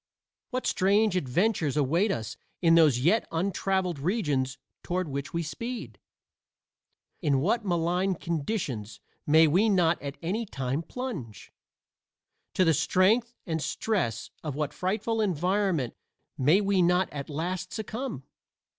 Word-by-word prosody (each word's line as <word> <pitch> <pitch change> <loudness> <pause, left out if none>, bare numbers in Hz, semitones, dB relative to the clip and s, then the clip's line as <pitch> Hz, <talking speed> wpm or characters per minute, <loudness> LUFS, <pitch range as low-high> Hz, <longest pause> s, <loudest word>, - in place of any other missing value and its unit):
What 255 -1 -3
strange 200 +1 +3
adventures 165 - +1
await 165 +9 +2
us 110 -2 -4 0.2
in 165 -2 +4
those 155 -6 +6
yet 170 - +2
untraveled 185 -1 0
regions 145 - 0 0.2
toward 180 0 -2
which 140 0 -4
we 170 0 -1
speed? 160 - -6 1.2
into 140 -2 +2
what 210 - +1
malign 180 +1 +1
conditions 155 - -3 0.3
may 160 +2 +7
we 185 +9 +3
not 175 -4 +3
at 140 0 -6
any 210 +7 -2
time 135 -3 -2
plunge? 170 - -7 1.0
to 185 - +4
the 165 - +4
strength 220 - +2
and 160 -3 -2
stress 180 - -1
of 150 -4 -4
what 150 -1 -2
frightful 215 +4 -1
environment 185 - 0 0.4
may 155 +10 +4
we 195 -2 +2
not 180 +1 +3
at 140 0 -5
last 180 +5 -3
succumb? 220 - -5
175 Hz, 130 wpm, -28 LUFS, 145-200 Hz, 1.2 s, may